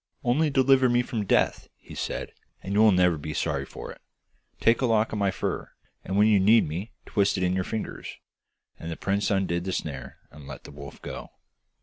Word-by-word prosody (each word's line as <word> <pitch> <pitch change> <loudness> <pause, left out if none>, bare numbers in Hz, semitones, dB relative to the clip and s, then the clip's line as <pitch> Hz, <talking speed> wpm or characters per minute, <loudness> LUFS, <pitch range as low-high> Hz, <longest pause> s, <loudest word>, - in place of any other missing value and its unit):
'Only 145 +5 +2
deliver 135 -1 +4
me 120 0 +3
from 110 -4 -3
death,' - - +1
he - - -14
said, - - -4 0.3
'and 95 - -4
you 105 - +2
will 110 -1 +7
never 90 -3 +3
be 75 +1 -5
sorry 70 -1 -1
for - - -9
it. - - -14 0.6
Take 115 +3 +3
a 130 - +2
lock 110 -1 +2
of 105 - -2
my 100 -1 +2
fur, 95 - -3 0.3
and 95 - -2
when 105 - +6
you 105 -2 +5
need 110 +2 +5
me 90 +9 -5
twist 100 -1 +1
it 95 - -1
in 90 0 +1
your 95 0 0
fingers.' 110 +3 -5 0.6
And 80 - -6
the 80 - -5
prince 100 +1 0
undid 95 -3 0
the 95 - -3
snare 70 -7 -5
and 75 -2 -13
let - - -9
the - - -11
wolf 70 -1 -11
go. - - -7
100 Hz, 215 wpm, -26 LUFS, 85-115 Hz, 0.6 s, will